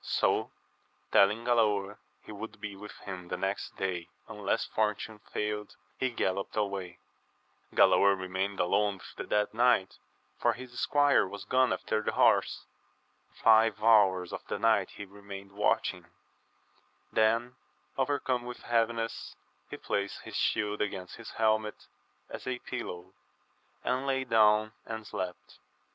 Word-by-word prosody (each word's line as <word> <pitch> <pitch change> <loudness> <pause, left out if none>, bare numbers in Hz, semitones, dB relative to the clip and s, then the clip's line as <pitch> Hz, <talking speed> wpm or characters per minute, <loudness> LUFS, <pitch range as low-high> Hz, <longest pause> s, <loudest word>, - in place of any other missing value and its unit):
So - - +1 0.6
telling 105 +4 +4
Galaor 105 -4 +2 0.2
he - - -11
would 110 +1 -8
be 105 -2 -6
with 105 +1 -10
him 90 -2 -7
the - - -3
next 95 +1 -3
day 90 -3 -2 0.2
unless - - -1
fortune 110 0 -2
failed, 105 0 -3 0.2
he 130 - +1
gallopped 100 -5 -2
away. 100 -4 -2 0.8
Galaor 100 -1 +5
retrained 95 +2 -3
alone 100 +3 +2
with 95 - -13
the - - -5
dead 105 0 0
knight, 120 -4 +2 0.4
for 120 - +3
his 125 +1 -9
squire 145 -7 +3
was 100 +2 -8
gone 130 0 +3
after 110 - -1
the - - -2
horse. - - +3 0.8
Five 110 -1 +5
hours 95 -5 +4
of - - -4
the - - -2
night 110 -4 +3
he 100 - -9
remained 100 0 -10
watching; 105 +1 0 1.1
then, 115 +3 +2 0.4
overcome 135 -2 0
with 125 0 -8
heaviness, 115 -1 -1 0.3
he - - -6
placed 100 0 -3
his - - -9
shield 105 0 0
against 95 -3 -4
his 115 - -9
helmet 110 -1 0 0.4
as - - -8
a 130 -1 -1
{pillow, 95 -8 -6 0.7
and 130 +2 -1
lay 135 -1 +1
down 110 -2 +4
and 110 -1 -6
slept. 90 -3 -6
105 Hz, 135 wpm, -30 LUFS, 100-115 Hz, 1.1 s, Galaor